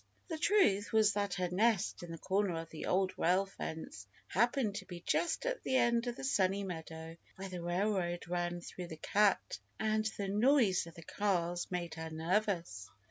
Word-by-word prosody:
The 320 -2 -3
truth 300 - +3
was 215 -2 +4
that 200 -2 -1
her 180 -2 -1
nest 210 +2 +1
in 175 - -8
the 165 - -6
corner 190 -1 0
of 165 0 -8
the 160 - -6
Old 185 0 +2
Rail 185 +3 +3
Fence 160 - -7 0.2
happened 235 +1 +2
to 195 - -6
be 175 -1 -8
just 345 - +1
at - - -1
the 260 - -1
end 235 -1 +3
of 240 - -2
the - - -8
Sunny 200 -6 +2
Meadow 160 -2 -7 0.2
where 195 0 -6
the 180 -1 -5
railroad 175 0 -1
ran 175 0 -2
through 180 +1 -7
the 160 - -8
"cut," 205 +4 +2 0.2
and 215 0 +1
the 200 - -2
noise 210 - +3
of 165 - -12
the 165 - -10
cars 175 -2 -1
made 175 -2 -3
her 160 0 -5
nervous. 165 - -1
190 Hz, 190 wpm, -34 LUFS, 175-215 Hz, 0.2 s, was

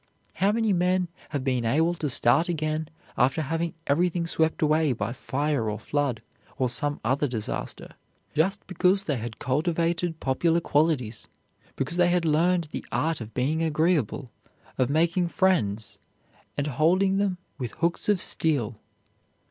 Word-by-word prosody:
How 195 +2 +2
many 220 -1 +1
men 180 0 +1 0.2
have 145 -4 -3
been 130 -3 0
able 160 +9 +2
to 155 -4 -3
start 135 +7 +4
again 155 -1 -2 0.3
after 130 +5 +3
having 165 +3 -2
everything 170 +3 +1
swept 160 -1 +1
away 155 -2 +3
by 110 0 -3
fire 135 -3 -1
or 105 - -3
flood, 130 -1 -2 0.3
or 130 -1 +1
some 145 +5 0
other 135 +5 +1
disaster, 115 -5 -4 0.4
just 190 +7 0
because 185 +2 +2
they 145 -8 -1
had 115 -1 -6
cultivated 165 +4 -1
popular 165 +6 +1
qualities, 135 - 0 0.5
because 145 +6 -2
they 175 -1 +4
had 175 -1 +1
learned 165 +1 +2
the - - -5
art 160 -3 0
of 110 0 -9
being 145 +6 0
agreeable, 155 - +1 0.5
of 130 -1 +1
making 170 +4 +2
friends 115 - 0 0.6
and 145 - 0
holding 180 +7 +2
them 195 -3 0 0.2
with 125 -4 -4
hooks 170 +4 -1
of 205 -3 +3
steel! 135 -11 +2
155 Hz, 150 wpm, -26 LUFS, 130-175 Hz, 0.6 s, start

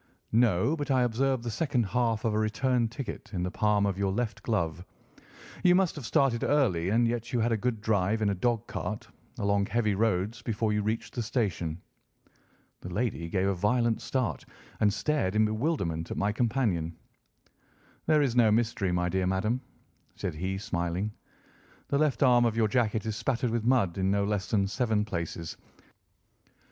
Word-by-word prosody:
"No, 115 - +3
but 145 -2 -4
I 130 -2 +3
observe 125 +1 0
the 120 - -3
second 130 0 0
half 115 +2 0
of 110 - +1
a 105 - +1
return 120 +2 +1
ticket 120 +3 -7
in 90 - -1
the 90 - -2
palm 105 -1 +2
of 100 -1 -1
your 100 -1 +1
left 110 +2 -2
glove. 90 -6 -1 0.8
You 180 -1 +6
must 185 -2 +2
have 140 -6 -6
started 125 -4 +2
early, 95 - +2
and 115 +3 +3
yet 120 0 -3
you 125 - +1
had 115 +1 +1
a - - +3
good 115 0 -2
drive 105 0 +1
in - - +2
a - - +1
dog 115 +3 0
cart, - - -5 0.3
along 100 0 +1
heavy 110 -1 +1
roads, 105 +1 0
before 110 -1 -1
you 105 - +1
reached 110 +3 -2
the 120 - -2
station." 100 -8 -2 1.0
The 90 - -8
lady 100 -5 -2
gave 95 +1 0
a 100 - +2
violent 115 +5 +1
start 115 - -2 0.4
and 105 -1 +4
stared 105 -4 0
in 110 0 +4
bewilderment 110 - -1
at - - -4
my 100 +1 +1
companion. 105 -8 0 1.1
"There 155 -1 +4
is 125 -4 0
no 115 -3 +5
mystery, 110 -4 +1
my 90 0 +1
dear 95 +1 0
madam," 110 +7 0 0.5
said - - -3
he, 95 +5 -3
smiling. 90 +1 -2 0.8
"The 140 - +1
left 150 -2 +2
arm 120 -2 +5
of 115 -1 0
your 110 -1 +3
jacket 110 -1 0
is 110 -2 -2
spattered 125 0 -1
with 115 -1 -1
mud 115 -8 +2
in 95 0 +1
no 100 0 +2
less 100 -1 -1
than 100 -3 +2
seven 110 0 0
places. 85 -3 -5
110 Hz, 180 wpm, -28 LUFS, 95-120 Hz, 1.1 s, You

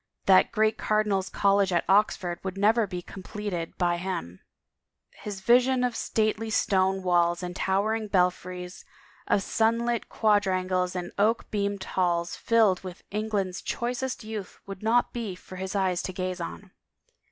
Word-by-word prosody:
That 190 -1 +5
great 220 0 +1
Car 215 0 +2
dinals' 195 -3 -1
College 200 -1 +3
at 175 -1 +1
Oxford 190 -3 +2
would 190 0 -4
never 215 +2 +3
be 180 -2 -5
completed 190 -3 -6
by 175 -1 +1
him; 170 - -4 0.7
his 200 -2 -8
vision 250 +3 +4
of 245 -2 0
stately 220 0 0
stone 190 -2 +1
walls 175 -1 +2
and 180 0 -5
towering 215 +4 0
belfries, 180 -1 -1 0.4
of 195 - +2
sunlit 230 +1 0
quadrangles 185 -3 +1
and 175 -1 -4
oak 220 +3 +1
beamed 200 -2 -1
halls 175 -2 0
filled 220 -6 +2
with 185 -1 -9
England's 205 -3 -2
choicest 250 +1 -3
youth 215 -3 -7
would 195 -1 -8
not 230 +3 +2
be 225 -6 -4
for 185 0 -12
his 190 +1 -5
eyes 185 -3 +1
to 185 - -5
gaze 185 -1 -3
on. 185 +3 -7
195 Hz, 150 wpm, -27 LUFS, 180-215 Hz, 0.7 s, That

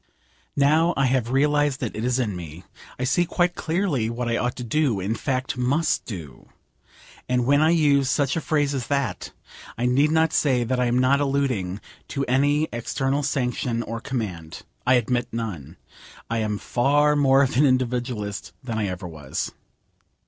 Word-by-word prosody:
Now 155 +5 +3
I 135 - +3
have 125 -2 +1
realised 145 +1 +2
that 120 - -4
it 110 - -4
is 125 0 +1
in 110 -7 -1
me, 85 0 -8 0.3
I 130 - -3
see 140 +7 +2
quite 175 +1 0
clearly 160 - -1
what 120 +1 -3
I 115 - +1
ought 125 +1 -1
to 125 - -6
do; 125 -3 +1
in 95 +4 -1
fact, 130 +1 -2
must 145 +6 +1
do. 80 - -9 0.8
And 125 -1 +1
when 145 +3 +4
I 155 - +4
use 145 -5 +3
such 140 0 +1
a 165 - -1
phrase 145 -2 0
as 130 -3 -3
that, 140 -4 -2 0.5
I 120 - -1
need 135 +5 +3
not 160 0 +2
say 130 -5 +2
that 125 +2 -1
I 125 - +2
am 120 +1 +1
not 130 +3 +3
alluding 130 -9 -1 0.3
to 140 0 -2
any 145 +4 +2
external 135 +4 -1
sanction 125 -4 -1
or 115 0 -5
command. 90 -11 -5 0.2
I 130 - +6
admit 120 0 0
none. 110 - -5 0.5
I 115 - 0
am 105 -1 -1
far 145 +7 +2
more 135 -1 +4
of 130 - -1
an 145 +4 +5
individualist 120 -5 -2
than 115 -4 -3
I 105 - 0
ever 90 0 -5
was. 75 -5 -5
130 Hz, 180 wpm, -24 LUFS, 115-145 Hz, 0.8 s, I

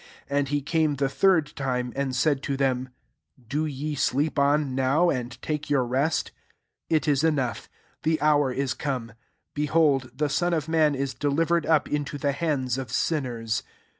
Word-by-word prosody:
41 140 0 +1
And 140 - 0
he 145 +1 0
came 155 -1 +1
the 135 0 0
third 160 -1 +2
time, 125 -4 -2
and 135 -1 -1
said 140 +1 +2
to 140 -1 -2
them, 130 -2 0 0.3
" 125 -3 -30
Do 150 +4 0
ye 150 +1 -4
sleep 145 +2 0
on 140 -1 +2
now, 135 +7 +3
and 125 -1 -4
take 150 -1 -3
your 135 -3 +2
rest? 135 +6 0 0.6
It 155 -1 +1
is 145 -1 +2
enough: 140 -7 0 0.3
the 160 0 +1
hour 145 -2 +3
is 135 +1 -1
come: 125 -6 -4 0.4
behold, 145 -3 +2
the 150 +2 0
Son 175 +4 +1
of 155 -1 -2
man 155 -3 +3
is 135 0 -2
delivered 160 +6 +1
up 160 -2 +3
into 145 0 -2
the 140 0 0
hands 135 -5 -1
of 130 -4 -6
sinners. 120 -8 -1
140 Hz, 175 wpm, -26 LUFS, 130-155 Hz, 0.6 s, now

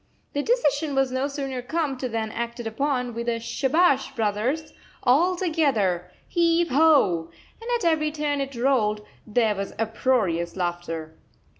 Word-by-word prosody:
The 285 - 0
decision 300 - +1
was 270 -1 +2
no 260 +2 0
sooner 275 -3 -4
come 290 +2 -1
to 255 - -2
than 220 -1 -2
acted 235 +1 -4
upon, 250 +1 -1
with 235 +1 -3
a 230 -1 -1
"Shabash, 275 +3 +1
brothers! 230 +8 -1 0.3
All 320 +9 +4
together! 265 - +1 0.2
Heave 340 0 +2
ho!" 260 - +4 0.3
And 460 - -7
at 465 - -5
every 310 -2 +2
turn 295 -2 -1
it 275 -1 -4
rolled, 225 -5 +1 0.2
there 220 0 +2
was 200 -1 -5
uproarious 220 -6 0
laughter. 175 -3 -3
260 Hz, 145 wpm, -25 LUFS, 220-300 Hz, 0.3 s, All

